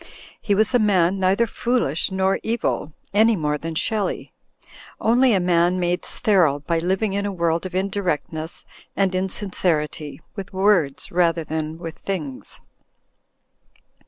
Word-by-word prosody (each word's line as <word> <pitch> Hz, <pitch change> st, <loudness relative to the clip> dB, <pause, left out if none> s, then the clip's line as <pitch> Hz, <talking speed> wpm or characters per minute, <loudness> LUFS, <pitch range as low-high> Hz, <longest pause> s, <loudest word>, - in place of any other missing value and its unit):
He 205 Hz, -2 st, +1 dB
was 215 Hz, +4 st, +3 dB
a 245 Hz, -, +5 dB
man 195 Hz, -3 st, +3 dB
neither 190 Hz, +5 st, +3 dB
foolish 230 Hz, -, 0 dB
nor 190 Hz, 0 st, +1 dB
evil, 225 Hz, -8 st, -1 dB, 0.2 s
any 220 Hz, +2 st, +5 dB
more 150 Hz, -4 st, -1 dB
than 165 Hz, +1 st, -5 dB
Shelley; 210 Hz, +4 st, -2 dB, 0.7 s
only 245 Hz, +3 st, +4 dB
a -, -, +3 dB
man 175 Hz, 0 st, +2 dB
made 175 Hz, 0 st, 0 dB
sterile 175 Hz, -9 st, +2 dB
by 165 Hz, +2 st, 0 dB
living 190 Hz, +4 st, 0 dB
in 200 Hz, +1 st, -1 dB
a -, -, -2 dB
world 170 Hz, -1 st, 0 dB
of 185 Hz, -, -10 dB
indirectness 175 Hz, -5 st, -2 dB, 0.3 s
and 195 Hz, -2 st, +2 dB
insin 190 Hz, +1 st, -3 dB
cerity, 150 Hz, -4 st, -1 dB, 0.2 s
with 200 Hz, -1 st, -7 dB
words 185 Hz, -8 st, +2 dB
rather 170 Hz, -1 st, +2 dB
than 155 Hz, 0 st, -4 dB
with 165 Hz, -1 st, -8 dB
things. 155 Hz, -9 st, -5 dB
185 Hz, 140 wpm, -22 LUFS, 165-200 Hz, 0.7 s, a